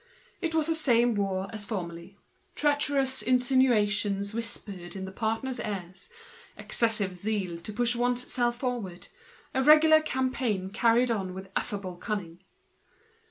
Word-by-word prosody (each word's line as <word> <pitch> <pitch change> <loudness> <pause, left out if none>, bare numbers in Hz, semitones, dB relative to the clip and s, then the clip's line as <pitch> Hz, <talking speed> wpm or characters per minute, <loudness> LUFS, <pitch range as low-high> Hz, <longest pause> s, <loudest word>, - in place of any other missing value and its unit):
It 330 -2 -1
was 315 -2 +3
the 325 - +1
same 245 -6 +3
war 195 -2 -1
as 215 -1 -5
formerly, 180 -2 -6 0.4
treacherous 285 -3 +1
insinuations 215 -6 +2
whispered 205 -5 -6
in 190 -1 -5
the 190 - -7
partners' 225 +5 -2
ears, 190 - -6 0.5
an - - -9
excessive 225 -4 +2
display 200 +5 -2
of - - 0
zeal - - 0
in 180 -2 -6
order 170 - -15
to 215 - -6
push 240 +2 +2
one's 245 +1 -1
self 240 -1 +1
forward, 235 -9 -4 0.4
a 265 - +1
regular 310 +2 +7
campaign 255 -9 -1
carried 235 +3 +3
on 190 -5 -2
with 190 0 -9
affable 190 -3 -3
cunning. 180 -4 -4
225 Hz, 155 wpm, -28 LUFS, 195-255 Hz, 0.5 s, regular